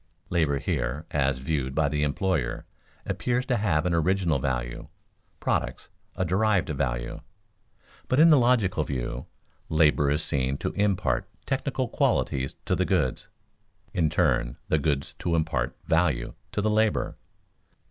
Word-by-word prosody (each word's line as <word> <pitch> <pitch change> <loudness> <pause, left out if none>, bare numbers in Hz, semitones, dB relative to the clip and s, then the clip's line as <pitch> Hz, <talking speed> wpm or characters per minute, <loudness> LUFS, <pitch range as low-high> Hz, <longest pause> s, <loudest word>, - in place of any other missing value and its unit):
Labor 80 -5 +2
here, 70 +2 -2
as 70 -2 +1
viewed 65 -1 -2
by 80 -2 +3
the 75 +1 -1
employer, 75 -3 0 0.4
appears 125 +1 -1
to 125 -3 +1
have 90 -7 +1
an 90 - +1
original 85 -2 +2
value; 60 -3 -3 0.5
products, - - -2 0.3
a 95 - 0
derived 100 +1 +2
value. - - -2 0.9
But 130 - +2
in 165 +1 +8
the 150 - +7
logical 110 -9 +3
view, 65 -3 -4 0.4
labor 75 -2 +4
is 75 +2 +1
seen 65 0 -1
to - - -2
impart 100 -2 0 0.2
technical - - -1
qualities 65 0 0
to - - +1
the 95 - +1
goods; 85 -10 0 0.7
in 80 -3 +2
turn, - - +1
the 80 - +3
goods 70 -2 -1
to 85 - 0
impart 80 -1 -1
value 80 -8 +1 0.2
to 105 - -1
the 110 - +2
labor. 105 - +1
80 Hz, 140 wpm, -26 LUFS, 70-95 Hz, 0.9 s, in